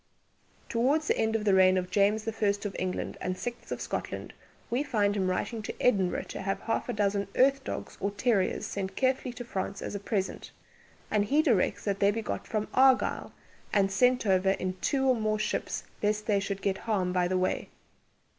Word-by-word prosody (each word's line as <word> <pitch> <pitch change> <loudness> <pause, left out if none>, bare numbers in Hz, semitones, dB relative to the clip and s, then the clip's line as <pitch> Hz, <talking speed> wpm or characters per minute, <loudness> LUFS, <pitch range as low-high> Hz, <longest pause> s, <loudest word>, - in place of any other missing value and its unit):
Towards 275 +7 +1
the - - +3
end 220 0 +1
of 215 -1 -1
the 200 - +4
reign 185 0 +6
of 180 0 -2
James 205 +2 +3
the 225 - -2
First 205 -1 0
of 200 - -3
England 185 0 -3
and 185 0 -2
Sixth 240 +3 -6
of - - -2
Scotland, - - -4 0.4
we 245 +3 +1
find 210 -8 +1
him 190 -2 +1
writing 220 +5 -2
to 215 - -7
Edinburgh 195 -7 +2
to - - -5
have 195 0 -2
half 225 - -2
a - - 0
dozen 200 -1 0
"earth 275 +1 +4
dogges - - -6
or 200 - +1
terrieres" 205 -1 0
sent 195 -1 -4
carefully 260 -1 +1
to 245 0 -7
France 195 -2 -4
as - - -5
a 200 - -3
present, 200 -1 -3 0.6
and 210 -1 +2
he 295 +8 +3
directs 230 - +1
that 200 -1 -1
they 200 - +4
be 220 +2 -1
got - - -4
from 215 -1 -2
Argyll, 260 0 +3 0.4
and 195 -2 +2
sent 250 +4 +3
over 190 -1 +3
in 185 -1 -3
two 270 -1 +1
or 260 - +5
more 215 -1 0
ships 215 - -2 0.2
lest 210 0 0
they 205 -2 +2
should 195 0 -4
get 190 -1 0
harm 190 -5 -1
by 180 -1 +2
the 185 +1 0
way. 185 0 -1
205 Hz, 205 wpm, -29 LUFS, 195-230 Hz, 0.6 s, reign